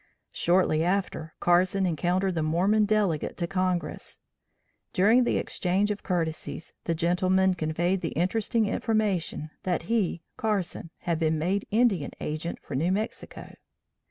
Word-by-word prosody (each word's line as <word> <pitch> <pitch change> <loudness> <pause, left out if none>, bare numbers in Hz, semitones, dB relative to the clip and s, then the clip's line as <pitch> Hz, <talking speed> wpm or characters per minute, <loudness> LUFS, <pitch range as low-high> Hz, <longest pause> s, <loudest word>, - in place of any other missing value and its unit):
Shortly 170 -3 +2
after 180 -3 -1
Carson 185 +2 +3
encountered 180 +3 0
the 165 - -1
Mormon 185 +7 +2
delegate 205 -7 0
to 175 - -1
Congress. 185 -1 -2 0.7
During 220 +6 +5
the - - +1
exchange 195 +3 0
of 205 - -4
courtesies, 165 -2 -3
the 165 - 0
gentleman 185 +3 +2
conveyed 175 +3 0
the 165 - -3
interesting 215 +6 +1
information 200 -8 -1
that 180 -2 -1
he 200 -7 0
Carson 200 -6 -2
had 170 -2 -1
been 160 -1 +1
made 185 +6 -1
Indian 215 -8 +2
Agent 155 +3 -3
for - - -8
New 160 +7 +1
Mexico. 210 +3 -4
180 Hz, 130 wpm, -27 LUFS, 165-200 Hz, 0.7 s, During